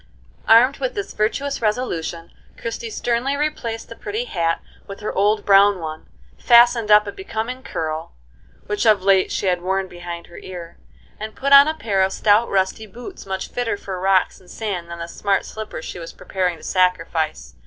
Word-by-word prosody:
Armed 245 +5 +6
with - - -2
this 405 -1 -4
virtuous 275 +7 -1
resolution, 175 -7 -2 0.3
Christie - - -5
sternly 255 - -1
replaced 250 -7 -3
the 230 - -10
pretty 215 +3 -4
hat 165 -7 0 0.3
with 195 - -8
her 210 - -3
old 205 +2 +1
brown 200 -1 +5
one, 155 -1 -7 0.3
fastened 235 -2 +5
up 210 0 +7
a 200 - -4
becoming 250 - -5
curl, 160 -8 -4 0.5
which 210 +2 -1
of 210 -3 +4
late 195 -1 +3
she - - -2
had 180 -2 +1
worn 190 +1 -1
behind 175 -1 -8
her 170 - -12
ear, 175 -2 -9 0.4
and 215 +1 -6
put 275 +1 +1
on 280 +1 +10
a 315 - -1
pair 205 -9 0
of 190 0 +2
stout, 215 +3 +3
rusty 195 +3 0
boots, 245 - -10
much 190 0 -4
fitter 240 -4 -2
for 190 -2 -6
rocks 190 0 +2
and 180 - -20
sand 185 -6 -4
than 170 - -6
the 170 0 -6
smart 195 +3 -1
slippers 215 -6 -7
she - - -7
was 165 - -8
preparing 180 -3 -2
to - - -17
sacrifice. 165 - 0
205 Hz, 185 wpm, -21 LUFS, 180-235 Hz, 0.5 s, on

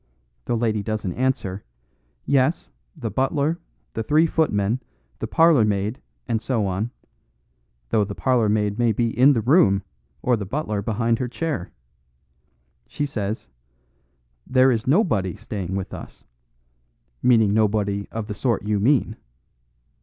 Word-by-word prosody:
the 120 - 0
lady 110 -2 0
doesn't 105 -3 -3
answer 120 -7 -1 0.6
'Yes; 140 +3 +1 0.2
the 120 -9 -4
butler, 140 - 0 0.3
the 110 - -2
three 150 +8 +3
footmen, 120 -8 +1 0.4
the - - -3
parlourmaid, 110 -9 +3 0.3
and 110 -1 0
so 115 -5 0
on,' 95 +4 -2 1.0
though 105 - +3
the 100 0 -5
parlourmaid 110 -4 +1
may 120 -2 +3
be 115 +1 -1
in 135 +4 +6
the 115 - 0
room, 100 - +4 0.4
or 125 - +3
the 105 - -4
butler 105 -1 -2
behind 115 +2 0
her 125 - -1
chair. 140 - -3 1.2
She 145 - -2
says 110 -5 -4 1.0
'There 130 0 +4
is 115 -1 -1
nobody 125 - +2
staying 100 -4 -5
with 95 -1 -4
us,' - - -10 1.0
meaning 110 -5 +4
nobody 105 -2 +1
of 115 -1 -4
the 105 - -5
sort 115 0 -1
you 105 0 0
mean. 125 +5 +2
110 Hz, 130 wpm, -23 LUFS, 105-130 Hz, 1.2 s, in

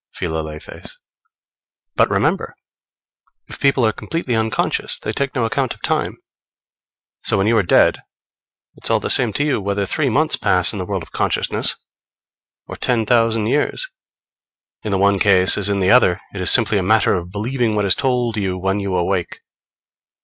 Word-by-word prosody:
Philalethes. 80 -1 -6 1.0
But - - +3
remember, - - -1 0.9
if - - -8
people 135 -3 +2
are 110 - +3
completely 135 +1 -3
unconscious, 110 -1 0
they 110 - -5
take 135 +3 -3
no 120 -3 0
account 135 +1 -2
of - - -26
time. - - -1 1.0
So, - - 0
when 95 - +1
you 115 +2 +2
are 110 - +4
dead, 90 - +3 0.7
it's - - -3
all - - +2
the - - -2
same 120 -3 +2
to 145 - 0
you 145 -7 0
whether 100 0 -2
three 140 +7 -1
months 155 +6 +2
pass 90 -4 +3
in 105 - -5
the 90 - -5
world 95 -4 -3
of - - -15
consciousness, - - -1 0.9
or - - -9
ten 115 -3 0
thousand 115 -2 +2
years. 150 - -1 0.9
In 110 - -5
the 100 - +1
one 100 0 +2
case 95 -2 +4
as 100 0 -1
in 100 - 0
the 95 -1 +2
other, 95 -7 +4
it 95 - -5
is 90 - +3
simply 110 -4 +4
a - - -1
matter 105 +3 +3
of 90 -1 -3
believing 115 +2 -1
what 105 -1 0
is 95 - +5
told 125 -4 -1
you 95 -3 -2
when 95 +2 -1
you 100 -2 -2
awake. 90 0 -2
105 Hz, 180 wpm, -19 LUFS, 95-120 Hz, 1.0 s, is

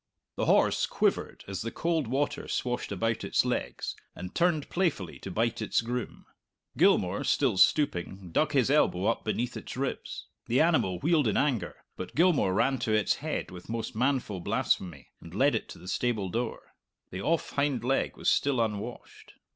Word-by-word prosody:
The - - -1
horse - - +3
quivered - - -1
as 95 -1 -4
the 115 - -3
cold 165 0 -1
water 145 +4 -1
swashed 125 -2 -2
about 115 +3 -1
its - - +2
legs, - - -2 0.2
and 90 0 -7
turned 170 -4 +1
playfully 165 - -1
to - - -7
bite 115 +4 0
its 110 - +1
groom. 120 0 -5 0.5
Gilmour, 90 +2 +3
still 130 -8 +2
stooping, 95 - +2
dug 150 - +1
his 135 -1 +3
elbow 100 -10 +3
up 115 - +1
beneath 120 +3 -2
its - - -7
ribs. 135 +1 -4 0.2
The 125 +3 +2
animal 155 - +3
wheeled 155 -3 +3
in 105 - +1
anger, 135 -6 0 0.2
but 95 - -7
Gilmour 165 - +4
ran 135 +7 +2
to 115 - -1
its 110 -1 +2
head - - -3
with 90 +2 -11
most 115 -1 -4
manful 125 -5 0
blasphemy, 90 - -1
and - - -11
led - - +4
it - - -2
to - - -9
the 90 - -13
stable 110 -2 -1
door. 115 +3 -4 0.4
The 95 - -5
off 165 +9 0
hind 140 -3 0
leg 135 +2 0
was - - -4
still 140 -3 +3
unwashed. 110 +1 -4
120 Hz, 175 wpm, -29 LUFS, 100-140 Hz, 0.5 s, Gilmour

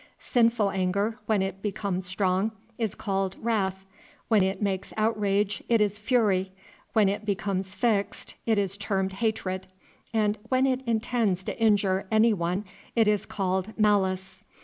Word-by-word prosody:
Sinful 230 -4 +2
anger, 200 +4 0
when 210 -3 +2
it 195 0 -4
becomes 195 -3 -2
strong, 185 +2 +1 0.3
is 220 -4 -1
called 195 -2 -1
wrath; 195 -4 -1 0.4
when 220 -3 +5
it 190 +1 0
makes 195 -2 -2
outrage 210 -2 +1
it 230 -1 +4
is 205 -1 +1
fury; 205 -5 +2 0.4
when 215 -3 +5
it 200 +2 -1
becomes 195 -1 -2
fixed 215 -5 0
it 220 -2 +3
is 195 -1 0
termed 195 -2 -1
hatred; 195 -3 -2 0.4
and 215 -2 +1
when 260 0 +3
it 260 -1 +1
intends 225 -4 +1
to - - -5
injure 200 -3 +3
any 220 +1 +4
one 180 +2 -1 0.3
it 225 -2 +4
is 210 -1 +1
called 190 +1 -2
malice. 190 -3 +1
200 Hz, 150 wpm, -27 LUFS, 190-220 Hz, 0.4 s, when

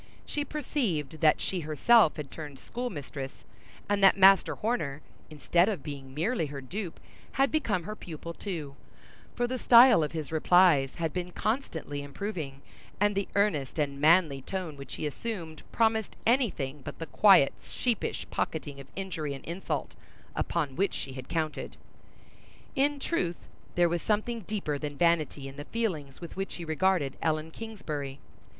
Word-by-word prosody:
She 295 - -2
perceived 225 - -2
that 155 -2 +5
she 185 - -1
herself 165 +5 +4
had 145 -3 -6
turned 145 -4 -8
schoolmistress, 145 - -6 0.4
and 205 -1 +1
that 195 - +7
Master 195 0 +6
Horner, 155 - -2 0.3
instead 170 +5 +2
of 190 -10 -3
being 135 -2 -8
merely 170 +2 0
her 140 -1 -6
dupe, 175 +6 -6 0.3
had 270 +2 +2
become 220 - 0
her 215 +5 -5
pupil 170 -3 -7
too; 160 -8 -5 0.6
for 245 - +1
the 255 +1 -3
style 240 -5 +8
of 150 - -1
his 155 -3 -5
replies 160 -4 +4
had 165 -2 -2
been 180 -1 -3
constantly 175 - -2
improving 145 -2 -5 0.4
and 205 +1 +3
the 200 0 -1
earnest 170 -11 +1
and 140 -2 -1
manly 155 -3 +5
tone 180 0 -4
which 140 -2 -8
he - - -4
assumed 160 -1 -5
promised 220 -2 +1
any 245 +1 +4
thing 140 -3 -5
but - - -7
the 165 - -5
quiet, 185 -3 +6
sheepish 240 -5 -2
pocketing 145 -3 -3
of 135 - -10
injury 165 -7 -3
and 135 - -11
insult, 175 +3 -3 0.4
upon 150 -6 -1
which 195 +3 +1
she 135 - -5
had 130 -1 -8
counted. 160 -2 -3 1.0
In 285 +1 +2
truth, 175 - -2 0.3
there 175 0 +5
was 170 0 -1
something 220 +2 0
deeper 185 -9 -2
than 145 -1 -5
vanity 155 -4 +1
in 135 +1 -10
the 145 - -6
feelings 165 - -3
with 170 - -8
which 195 0 -4
he 170 - -6
regarded 160 -3 +1
Ellen 155 0 0
Kingsbury. 150 -11 -6
170 Hz, 160 wpm, -29 LUFS, 145-205 Hz, 1.0 s, style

